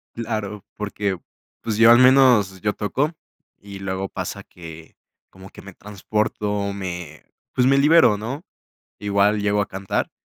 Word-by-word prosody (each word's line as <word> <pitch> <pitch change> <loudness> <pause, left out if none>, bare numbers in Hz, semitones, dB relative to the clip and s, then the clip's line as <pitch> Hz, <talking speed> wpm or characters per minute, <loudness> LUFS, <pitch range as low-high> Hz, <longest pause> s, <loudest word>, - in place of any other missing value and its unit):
Claro, 110 -3 -4
porque, 100 -2 -3 0.5
pues 110 -1 -3
yo 115 0 +7
al 120 - +8
menos, 125 -7 +5
yo 105 +1 -1
toco 135 +9 -1 0.5
y 100 -1 -10
luego 95 0 -4
pasa - - -5
que, 80 -2 -13 0.4
como 95 +1 -14
que - - -14
me 100 - -11
transporto, 105 0 -3
me 90 -5 -7 0.3
pues 125 - +2
me 135 +1 +4
libero, 145 -8 +5
¿no?, 130 +9 -5 0.6
igual 105 0 +1
llego 105 0 +1
a 100 - -2
cantar 95 0 -3
105 Hz, 145 wpm, -22 LUFS, 95-115 Hz, 0.6 s, al